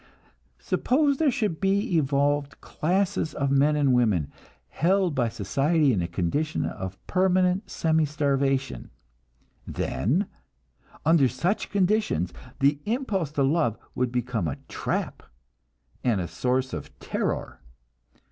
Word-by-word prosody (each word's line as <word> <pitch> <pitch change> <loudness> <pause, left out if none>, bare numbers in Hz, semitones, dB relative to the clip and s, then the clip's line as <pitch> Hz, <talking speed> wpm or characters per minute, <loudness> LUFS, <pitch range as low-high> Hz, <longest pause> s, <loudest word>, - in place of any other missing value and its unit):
Suppose 280 +1 +1
there 315 -1 +3
should 215 - -1
be 200 +1 +1
evolved 145 -1 +1
classes 180 -1 -1
of 140 -1 0
men 140 +2 +4
and 140 -3 +3
women, 105 - +2 0.4
held 185 0 +2
by 125 -4 +1
society 135 - +1
in 95 - 0
a 85 - -1
condition 95 - -1
of 95 -2 -5
permanent 185 +1 +2
semi 160 -1 +1
starvation; 140 -2 0 0.8
then, 160 - 0 0.8
under 160 -4 +5
such 170 - -1
conditions, 195 - +1 0.3
the 140 +1 +3
impulse 210 - -1
to 140 - +1
love 135 -5 +1 0.2
would 125 -1 -1
become 120 -6 -1
a 70 - -3
trap - - -3 0.8
and 115 -6 +2
a 85 - -2
source 130 +4 -1
of - - -7
terror. - - -3
145 Hz, 120 wpm, -26 LUFS, 125-180 Hz, 0.8 s, under